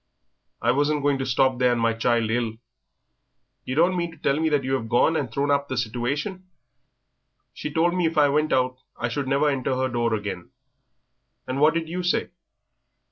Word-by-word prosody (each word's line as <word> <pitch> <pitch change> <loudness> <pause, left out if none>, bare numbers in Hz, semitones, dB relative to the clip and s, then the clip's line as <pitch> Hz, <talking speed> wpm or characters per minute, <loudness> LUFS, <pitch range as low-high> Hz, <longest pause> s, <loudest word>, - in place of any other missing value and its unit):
"I 120 - +4
wasn't 145 +2 +1
going 140 -1 +2
to 135 - -2
stop 130 0 +2
there 125 -1 +4
and 120 - 0
my 115 0 +2
child 115 0 +1
ill." 115 -1 0 1.1
"Yer 130 - -3
don't 175 +4 +3
mean 170 -1 -1
to 165 - -15
tell 145 0 0
me 160 0 +1
that 145 -3 +1
yer 130 +1 0
'ave 115 - -6
gone 120 +8 +3
and 135 -7 -2
thrown 140 +4 0
hup 140 0 +1
the 130 - -4
situation?" 135 - -3 1.1
"She 150 - -6
told 170 +3 +2
me 180 -2 +1
if 160 - -4
I 150 -1 +6
went 150 +2 +1
out, 130 0 +1 0.2
I 120 - -2
should 135 +3 -3
never 140 +3 +2
enter 135 -2 0
her 130 0 0
door 120 -2 0
again." 100 -4 -5 1.0
"And 130 +1 -3
what 155 +2 +5
did 165 -1 -1
you 175 +3 -3
say?" 180 0 0
135 Hz, 200 wpm, -24 LUFS, 120-150 Hz, 1.1 s, I